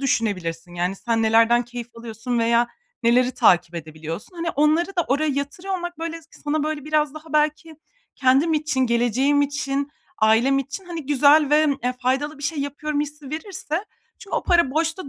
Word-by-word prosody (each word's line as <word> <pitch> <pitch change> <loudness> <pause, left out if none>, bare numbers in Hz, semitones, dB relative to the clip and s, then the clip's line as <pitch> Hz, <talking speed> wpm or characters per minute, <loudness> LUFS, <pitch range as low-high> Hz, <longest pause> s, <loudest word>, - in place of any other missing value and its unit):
düşünebilirsin. 185 -9 -2
Yani, 180 +2 -1
sen 230 +2 -1
nelerden 230 +2 +4
keyif 240 0 -7
alıyorsun 230 +1 -4
veya 235 +1 +3 0.3
neleri 245 +2 +4
takip 175 -1 +3
edebiliyorsun? 160 - -7
Hani, 335 0 -2
onları 305 +4 +2
da 345 - +2
oraya 295 +4 +1
yatırıyor 285 +8 -3
olmak, 350 -2 -6
böyle, 330 0 -5
s 320 - -23 0.2
sana, 295 0 0
böyle, 305 -2 -3
biraz 305 -1 +1
daha 310 0 -11
belki 305 +1 0 0.4
kendim 275 +5 +3
için, 300 -3 0
geleceğim 250 +4 +2
için, 285 -1 -2 0.3
ailem 230 +5 +4
için, 275 +7 -5
hani, 335 -5 -7
güzel 290 +1 +5
ve, 305 +1 +5 0.2
eee, 250 - +1
faydalı 275 +5 -1
bir - - -11
şey 300 +1 -2
yapıyorum 290 +1 -2
hissi 295 -2 -6
verirse 325 +1 -4 0.3
çü 395 - -13
o - - 0
para 340 -6 +3
boşta 325 +2 -1
285 Hz, 170 wpm, -23 LUFS, 235-310 Hz, 0.4 s, güzel